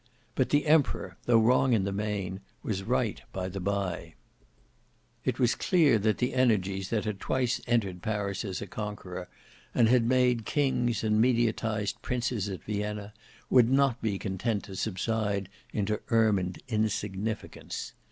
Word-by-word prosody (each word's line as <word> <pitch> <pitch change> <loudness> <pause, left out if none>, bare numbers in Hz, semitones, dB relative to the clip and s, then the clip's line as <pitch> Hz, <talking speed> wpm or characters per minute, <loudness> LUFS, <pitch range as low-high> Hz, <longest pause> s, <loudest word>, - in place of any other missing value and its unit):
But 130 - +1
the 145 0 +2
Emperor, 155 -2 +2
though 120 -1 +6
wrong 125 +3 +4
in 105 -4 +3
the 100 - -1
main, 100 -2 -3 0.2
was 100 -3 -2
right 95 - 0
by 95 -1 -3
the 95 +1 -5
bye. 90 -4 -2 1.1
It - - 0
was 120 -2 +3
clear 155 - +3
that 110 +1 +1
the 125 - 0
energies 100 -6 +1
that 110 -2 0
had 105 -2 -3
twice 125 -2 0
entered 100 -7 0
Paris 100 -2 -2
as 100 -2 -4
a - - -5
conqueror, 95 -3 -6 0.5
and 115 - +5
had 120 0 +4
made 125 -2 +3
kings 120 -3 +1
and 110 0 +3
mediatised 110 -3 +1
princes 120 -5 -1
at 95 -3 -6
Vienna, 105 0 -3 0.4
would 120 -2 +6
not 135 -2 +3
be 105 -3 0
content 100 +2 -2
to 95 - -9
subside 100 -1 -1 0.2
into 105 +1 -1
ermined 105 -6 +2
insignificance. 110 -1 -3
110 Hz, 150 wpm, -29 LUFS, 100-120 Hz, 1.1 s, though